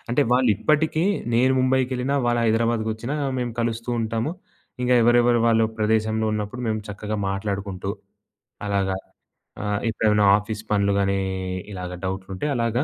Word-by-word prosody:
అంటే, 125 +5 +2
వాళ్ళు 125 -1 +4
ఇప్పటికి 155 +5 +1 0.3
నేను 130 +3 +4
ముంబైకెళ్ళినా, 130 +1 +1
వాళ్ళు 120 0 +2
హైదరాబాద్‌కొచ్చినా 115 +2 0 0.2
మేము 120 -1 -2
కలుస్తూ 115 0 -2
ఉంటాము. 115 +5 -1 0.5
ఇంగా 125 0 +3
ఎవరెవరు 120 0 +4
వాళ్ళు 115 -1 +4
ప్రదేశంలో 110 0 +1
ఉన్నప్పుడు 105 +3 -3
మేము 110 - 0
చక్కగా 105 +1 -4
మాట్లాడుకుంటూ 100 -1 -3 0.8
అలాగా 95 -1 0 0.7
ఆ! - - -3 0.2
ఎప్పుడేమైనా 105 -2 +2
ఆఫీస్ 105 +1 -5
పనులు 100 -1 +2
గానీ, 100 0 +1 0.5
ఇలాగ 90 -2 -6
డౌట్లు 95 0 -4
ఉంటే 150 - -3
అలాగా 120 +3 0
110 Hz, 130 wpm, -23 LUFS, 105-120 Hz, 0.8 s, వాళ్ళు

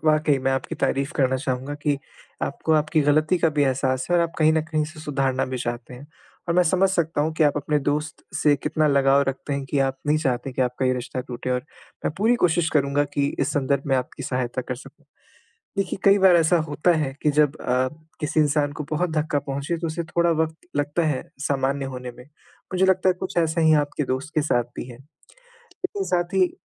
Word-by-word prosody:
वाक़ई 155 -2 +3
मैं 135 - +2
आपकी 130 -1 -2
तारीफ़ 140 +1 0
करना 130 -1 +2
चाहूँगा 130 +2 -3
कि 145 -2 +1 0.4
आपको 160 - -1
आपकी 155 +1 +2
ग़लती 155 +4 +3
का 165 - +3
भी - - +5
एहसास 130 -1 0
है 175 - +4
और 170 - +4
आप 165 - -2
कहीं 155 0 +5
न 160 - +2
कहीं 155 -2 +1
इसे 155 +1 -7
सुधारना 135 -3 0
भी - - -2
चाहते 120 +1 -5
हैं 135 +4 -12 0.4
और 170 - +1
मैं 180 - +5
समझ 185 +3 +3
सकता 165 -4 0
हूँ 155 +2 0
कि 160 - +5
आप 145 0 +2
अपने 150 +1 0
दोस्त 150 +1 -2
से 150 -1 +4
कितना 155 +2 0
लगाव 140 0 +4
रखते 135 +2 -4
हैं, 140 0 -2
कि 140 +1 -2
आप 135 -1 0
नहीं 150 +1 +3
चाहते 135 -2 -1
कि 130 - 0
आपका 125 +1 -1
ये 130 - +3
रिश्ता 125 +1 -4
टूटे 125 0 -5
और 125 0 0 0.4
मैं - - 0
पूरी 225 +4 +4
कोशिश 170 -1 +2
करूँगा 145 -1 +2
कि 140 -1 +2
इस - - 0
संदर्भ 140 -1 0
में 135 -1 +2
आपकी 125 - -4
सहायता 125 -1 -2
कर 125 - -4
सकूँ। - - -15 0.7
देखिए, 195 -1 -1
कई 200 0 +6
बार 190 -2 +6
ऐसा 170 +1 +4
होता 150 +5 +2
है 135 -3 -2
कि 150 - +3
जब 150 0 +2
आप 130 +4 0 0.2
किसी 155 0 0
इंसान 145 -1 +2
को - - -2
बहुत 170 +3 0
धक्का 155 -1 0
पहुँचे 140 +4 -3
तो 165 0 -3
उसे 165 +2 -3
थोड़ा 170 +1 +1
वक़्त 160 0 -2 0.2
लगता 145 +3 0
है 145 -4 -1 0.2
सामान्य 135 -1 0
होने 125 -1 -6
में, 125 - -14 0.5
मुझे 185 +1 +3
लगता 190 0 +3
है - - +3
कुछ - - -5
ऐसा 165 0 +2
ही 160 0 +5
आपके 145 +1 -3
दोस्त 135 +4 -5
के 155 - +3
साथ 120 -5 +1
भी - - -4
है। 120 - -10 0.6
लेकिन 390 +1 -5
साथ 175 - -1
ही 185 -2 +3
145 Hz, 225 wpm, -24 LUFS, 135-160 Hz, 0.7 s, कई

